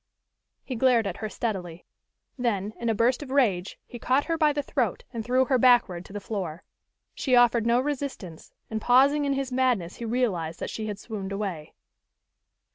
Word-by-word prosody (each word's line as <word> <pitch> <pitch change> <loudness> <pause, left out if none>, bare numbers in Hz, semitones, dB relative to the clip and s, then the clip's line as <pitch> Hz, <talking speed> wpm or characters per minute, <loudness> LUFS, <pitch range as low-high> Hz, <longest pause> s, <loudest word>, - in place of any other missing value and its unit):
He 260 - -5
glared 240 -2 +3
at 190 -3 -3
her 215 - -4
steadily. 180 -8 -4 0.5
Then, 215 -5 -1
in 235 - -1
a 225 - +1
burst 240 +6 +2
of 290 - -8
rage, 215 -10 +1
he 240 - -10
caught 260 +4 +1
her 330 - 0
by 310 -2 +3
the 290 0 -2
throat 245 -8 -1
and 230 -2 -4
threw 255 +3 +2
her 260 -1 +2
backward 235 -8 +4
to - - -13
the 205 - -4
floor. 185 -6 -5 0.5
She 255 -3 +1
offered 240 -2 +4
no 235 +1 +4
resistance, 265 - -5 0.2
and 220 0 -2
pausing 275 +5 +4
in 280 - +1
his 270 -1 -3
madness 250 -9 0
he 235 - -5
realized 200 -9 -1
that - - -4
she 215 -1 -4
had 205 -2 -4
swooned 200 -2 -6
away. 195 -6 -5
235 Hz, 190 wpm, -26 LUFS, 195-260 Hz, 0.5 s, backward